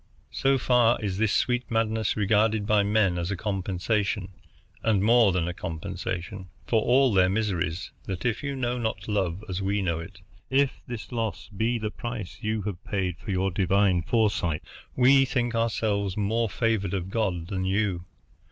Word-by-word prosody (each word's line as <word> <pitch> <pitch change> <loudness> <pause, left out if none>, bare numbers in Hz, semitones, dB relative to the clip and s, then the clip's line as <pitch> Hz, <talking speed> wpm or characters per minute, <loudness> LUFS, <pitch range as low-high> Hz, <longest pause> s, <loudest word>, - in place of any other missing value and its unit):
So 135 0 +2
far 125 -2 +3
is 100 -3 -3
this 110 -2 +2
sweet 125 0 0
madness 110 -2 0
regarded 105 +1 +2
by 105 0 +4
men 100 -3 +2
as 85 +1 -2
a 100 - -2
compensation, 100 0 -1 0.5
and 105 -4 +2
more 115 -1 +5
than 90 -2 0
a 90 - -2
compensation, 90 +2 -5 0.2
for 110 -2 +2
all 130 +1 +4
their 95 -1 +4
miseries 95 -5 -1
that 95 +1 -5
if 120 -3 0
you 140 -1 -3
know 125 -1 -1
not 110 -5 -3
love 100 -3 -1
as 95 0 -3
we 100 +1 0
know 85 -3 0
it, 95 +3 -10 0.3
if 135 +1 +1
this 120 -2 -7
loss 115 -4 -3
be 115 +4 +1
the 110 -1 -3
price 115 -6 -6
you 110 -1 -1
have 100 -2 -5
paid 95 -4 -2
for - - -10
your 95 0 +1
divine 95 0 +2
foresight, 100 -6 0 0.3
we 135 +2 +6
think 120 -3 -1
ourselves 105 -4 0
more 110 +2 +1
favored 100 -4 0
of 95 0 -4
God 95 -7 -1
than 95 -2 -2
you. 95 -2 0
105 Hz, 170 wpm, -26 LUFS, 95-115 Hz, 0.5 s, we